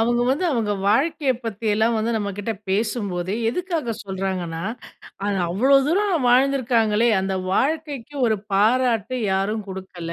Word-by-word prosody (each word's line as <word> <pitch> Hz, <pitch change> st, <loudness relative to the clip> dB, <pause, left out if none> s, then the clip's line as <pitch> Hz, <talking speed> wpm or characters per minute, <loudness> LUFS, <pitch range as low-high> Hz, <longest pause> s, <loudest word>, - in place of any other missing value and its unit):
அவங்க 240 Hz, +1 st, +2 dB
வந்து 280 Hz, +8 st, +1 dB
அவங்க 225 Hz, -6 st, 0 dB, 0.2 s
வாழ்க்கையை 280 Hz, +3 st, +2 dB
பத்தியெல்லாம் 220 Hz, +1 st, 0 dB
வந்து 225 Hz, +2 st, 0 dB
நம்மகிட்ட 205 Hz, +1 st, -3 dB, 0.2 s
பேசும்போது 195 Hz, -3 st, -1 dB, 0.2 s
எதுக்காக 325 Hz, -4 st, -2 dB
சொல்றாங்கன்னா, 185 Hz, -4 st, -3 dB, 0.6 s
அது 205 Hz, -1 st, 0 dB
அவ்வளோ 250 Hz, +11 st, +4 dB
தூரம் 350 Hz, -4 st, +1 dB
வாழ்ந்துருக்காங்களே, 240 Hz, -4 st, +3 dB
அந்த 190 Hz, 0 st, -2 dB, 0.2 s
வாழ்க்கைக்கு 295 Hz, +1 st, -1 dB
ஒரு 220 Hz, -1 st, +2 dB, 0.2 s
பாராட்டு 230 Hz, +3 st, +2 dB, 0.2 s
யாரும் 205 Hz, +3 st, -1 dB
குடுக்கல. 185 Hz, -3 st, -7 dB
225 Hz, 120 wpm, -22 LUFS, 195-260 Hz, 0.6 s, அவ்வளோ